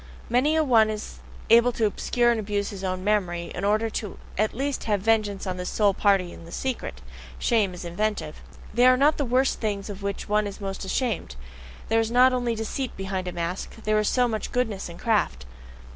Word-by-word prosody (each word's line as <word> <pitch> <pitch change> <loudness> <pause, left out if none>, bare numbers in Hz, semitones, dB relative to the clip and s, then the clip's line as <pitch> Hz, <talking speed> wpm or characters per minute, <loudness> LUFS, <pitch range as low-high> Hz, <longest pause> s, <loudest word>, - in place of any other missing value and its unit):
Many 270 +6 +3
a 315 - +3
one 225 -6 +4
is 215 -1 -6 0.3
able 235 +2 +7
to 230 - +1
obscure 240 +3 +1
and 230 - 0
abuse 205 -1 -2
his 195 -2 -8
own 185 -1 -2
memory, 180 -5 0
in 180 - -5
order 215 +2 +1 0.4
at 215 +2 0
least 275 +2 -2
to - - -8
have 205 -3 +1
vengeance 210 -2 +1
on 185 -1 -3
this 180 0 -4
sole 205 -2 +2
party 195 -3 +2
in - - -12
the 170 - -12
secret: 260 +5 -4 0.4
shame 210 -6 +1
is 175 - -8
inventive. 175 -2 -2 0.3
They 245 +3 +5
are 255 0 +6
not 290 +3 +4
the 285 - 0
worst 255 +2 +1
things 205 -2 -2
of 200 0 -9
which 200 0 -4
one 210 0 +2
is 200 - -8
most 195 -1 -5
ashamed: 210 - -2 0.5
there 225 +1 +3
is 225 0 0
not 250 +2 +5
only 245 -2 0
deceit 225 +4 -4
behind 190 -1 -3
a - - -2
mask 175 +2 -4
there 215 0 +2
is 210 - +1
so 250 -1 +3
much 220 -2 -3
goodness 225 -7 -1
in 170 - -10
craft. 185 - 0
215 Hz, 210 wpm, -25 LUFS, 195-240 Hz, 0.5 s, able